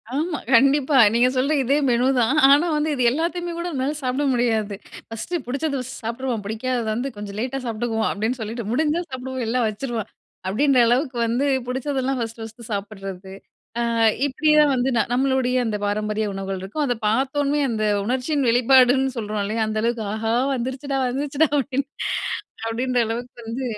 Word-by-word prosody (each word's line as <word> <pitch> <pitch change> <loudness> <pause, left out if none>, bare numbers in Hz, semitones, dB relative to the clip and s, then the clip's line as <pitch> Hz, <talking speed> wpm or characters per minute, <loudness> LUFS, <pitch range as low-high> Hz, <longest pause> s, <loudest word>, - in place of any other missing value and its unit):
ஆமா 310 +2 -1 0.2
கண்டிப்பா, 275 +3 +4 0.2
நீங்க 240 +2 +4
சொல்ற 265 +4 +1
இதே 275 +3 +2
மெனுதான் 250 +2 +2
ஆனா 290 +5 +5
வந்து 300 +1 0
இது 255 - 0
எல்லாத்தயுமே 345 +4 -2
கூட 340 +1 -3
என்னால 270 +2 -1
சாப்பிட 255 +3 0
முடியாது. 220 -4 0 0.3
ஃபர்ஸ்ட்டு 280 +11 -4
புடிச்சத 275 +2 -2 0.2
சாப்டுருவோம், 235 -1 -3
பிடிக்காதத 230 +2 -2
வந்து 250 +4 -2
கொஞ்சம் 205 -1 -7
லேட்டா 260 +3 -2
சாப்பிட்டுக்குவோம், 225 -1 -1
அப்டின்னு 225 +5 -2
சொல்லிட்டு 225 +2 -4
முடிஞ்சா 305 +6 +1
சாப்பிடுவோம் 260 0 -5
இல்லன்னா 240 +2 0
வச்சுருவோம். 225 0 -4 0.4
அப்டின்ற 260 +7 +3
அளவுக்கு 255 +2 +1
வந்து 240 +5 0 0.2
பிடிச்சதெல்லாம் 265 0 -1
ஃபர்ஸ்ட், 225 -1 -5
ஃபர்ஸ்ட்டு 225 +1 -10
சாப்பிடுறது. 195 -2 -6 0.5
ஆ, - - +1 0.5
இப்டியா 305 +2 +3
வந்து 255 +1 +1
நா 230 - +4
நம்மளுடய 260 0 +1
அந்த 215 -2 -1
பாரம்பரிய 210 +1 -1
உணவுகள் 195 0 -4
இருக்கும். 205 +11 -3
அத 245 -3 0
பாத்தோமே 275 +5 +1
அந்த 220 -2 -1 0.2
உணர்ச்சியின் 260 +3 0
வெளிப்பாடுன்னு 255 +2 +4
சொல்றோம் 210 -2 -2
இல்லயா 220 +2 -1
அந்த 215 0 -2
அளவுக்கு, 235 -1 0
ஆஹா 225 +1 -1 0.2
வந்துடுச்சுடா, 265 +3 -3
வந்துடுச்சுடா 280 +4 0
அப்டின்னு 275 0 -1 0.8
அப்டின்ற 250 +2 -1
அளவுக்கு 245 +3 -5
வந்து. 230 +4 -4
250 Hz, 150 wpm, -22 LUFS, 225-275 Hz, 0.8 s, ஆனா